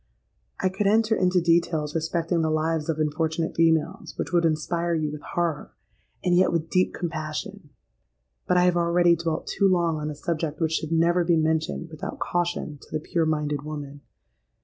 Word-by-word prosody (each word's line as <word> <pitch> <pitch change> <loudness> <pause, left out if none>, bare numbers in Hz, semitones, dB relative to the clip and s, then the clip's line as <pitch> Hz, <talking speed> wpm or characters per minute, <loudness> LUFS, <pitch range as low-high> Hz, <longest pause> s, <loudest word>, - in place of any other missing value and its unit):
"I 185 - +2
could 195 +2 -1
enter 220 +2 +3
into 185 -2 +2
details 165 -3 +1
respecting 165 +1 0
the 160 - +1
lives 155 0 0
of 160 - 0
unfortunate 160 +1 -1
females, 165 +3 +1
which 145 - -3
would 170 -1 +3
inspire 170 +2 0
you 155 -2 -1
with 150 0 -7
horror—and 175 +2 -4
yet 185 +1 +4
with 165 -1 -2
deep 185 0 +2
compassion. 160 +2 -5 0.8
But 180 - +3
I 180 - +5
have 180 -1 +3
already 170 0 +4
dwelt 165 -1 -3
too 200 - +1
long 170 -3 +2
on 150 0 -3
a 150 - -5
subject 155 -1 -3
which 160 -2 +1
should 160 -1 -2
never 170 +2 +3
be 170 -1 +3
mentioned 160 +1 0
without 155 - -6
caution 175 -4 -2
to - - -17
the 155 - -1
pure 160 +1 -1
minded 150 -2 -1
woman. 145 -1 -7
165 Hz, 175 wpm, -25 LUFS, 155-175 Hz, 0.8 s, I